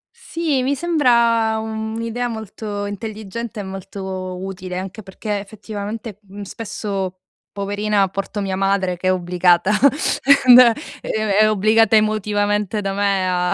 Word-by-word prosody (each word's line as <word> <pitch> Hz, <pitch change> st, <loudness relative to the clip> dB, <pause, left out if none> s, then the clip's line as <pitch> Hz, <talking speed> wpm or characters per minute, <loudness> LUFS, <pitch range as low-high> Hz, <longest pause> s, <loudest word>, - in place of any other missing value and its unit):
Sì, 330 Hz, -, -2 dB
mi 275 Hz, +2 st, +1 dB
sembra 235 Hz, -8 st, +2 dB
un'idea 220 Hz, +2 st, -3 dB
molto 215 Hz, -2 st, -5 dB
intelligente 215 Hz, +2 st, -6 dB
e -, -, -4 dB
molto 190 Hz, -1 st, -6 dB
utile 185 Hz, -1 st, -6 dB
anche 195 Hz, +3 st, -6 dB
perché 205 Hz, +2 st, -4 dB
effettivamente, 210 Hz, +1 st, -7 dB
mhmm, 200 Hz, 0 st, -11 dB
spesso, 200 Hz, -2 st, -5 dB, 0.3 s
poverina, 205 Hz, 0 st, 0 dB
porto 195 Hz, +2 st, -4 dB
mia 195 Hz, -1 st, -2 dB
madre, 195 Hz, -2 st, 0 dB
che 185 Hz, -, -3 dB
è 185 Hz, -, +4 dB
obbligata, 180 Hz, +1 st, +2 dB, 0.7 s
ehm, 250 Hz, -1 st, +9 dB, 0.4 s
è -, -, -8 dB, 0.3 s
è 215 Hz, -, +5 dB
obbligata 215 Hz, +2 st, +3 dB
emotivamente 210 Hz, -1 st, +1 dB
da 195 Hz, -1 st, -2 dB
me 195 Hz, -2 st, +1 dB
a- 180 Hz, -1 st, +1 dB
205 Hz, 130 wpm, -20 LUFS, 190-220 Hz, 0.7 s, ehm